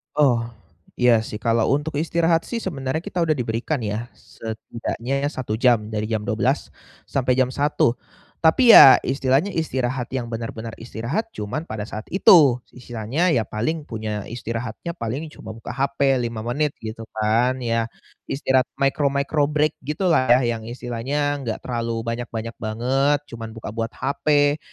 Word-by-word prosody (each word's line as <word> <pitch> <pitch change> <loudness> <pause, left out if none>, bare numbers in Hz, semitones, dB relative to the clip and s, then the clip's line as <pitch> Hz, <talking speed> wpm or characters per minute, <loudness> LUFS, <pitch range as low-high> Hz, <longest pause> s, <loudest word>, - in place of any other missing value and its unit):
Oh, 125 -6 +3 0.5
iya 120 -3 +3
sih, 105 - -7
kalau 115 -1 +2
untuk 145 +1 -1
istirahat 165 +1 +1
sih 230 -2 -4
sebenarnya 140 -3 -3
kita 180 - -8
udah 155 - +3
diberikan 120 +2 -2
ya, 110 +3 -4
setidaknya, 115 +4 -5
1 130 -7 -3
jam 115 -3 +3
dari 105 -1 -2
jam 110 -1 -1
12.00 - - 0 0.4
sampai 130 -2 +1
jam 130 0 +2
1.00. 140 -3 +1 0.5
Tapi, 230 +9 +7
ya, 135 - +10
istilahnya 135 +8 +1
istirahat 130 -6 -2
yang 125 -3 -3
benar-benar 115 -1 -6
istirahat 120 - -4
cuman 105 +9 -4
pada 110 -5 -5
saat 110 - -6
itu, 150 -10 +6 0.2
istilahnya, 125 +8 -1
ya 115 -7 +1
paling 150 +8 -2
punya 110 -2 -4
istirahatnya 115 +5 -5
paling 140 +4 -4
cuma 110 - -9
buka 115 - -7
HP 135 0 +1
5 110 -1 -6
menit, 145 +4 -1
gitu 110 0 -6
kan, 115 +4 +2
ya, 115 -1 0 0.4
istirahat 130 -2 +1
micro-micro 140 +1 +1
break 150 0 +1
gitulah, 155 -2 +1 0.2
yang 115 -2 -2
istilahnya 130 +4 -2
nggak 115 -4 -3
terlalu 115 -2 -2
banyak-banyak 115 -1 -4
banget 130 +6 +1
cuman 115 -1 -7
buka 110 -1 -7
buat 115 0 -3
HP, 145 +1 +1
125 Hz, 145 wpm, -22 LUFS, 115-145 Hz, 0.5 s, ya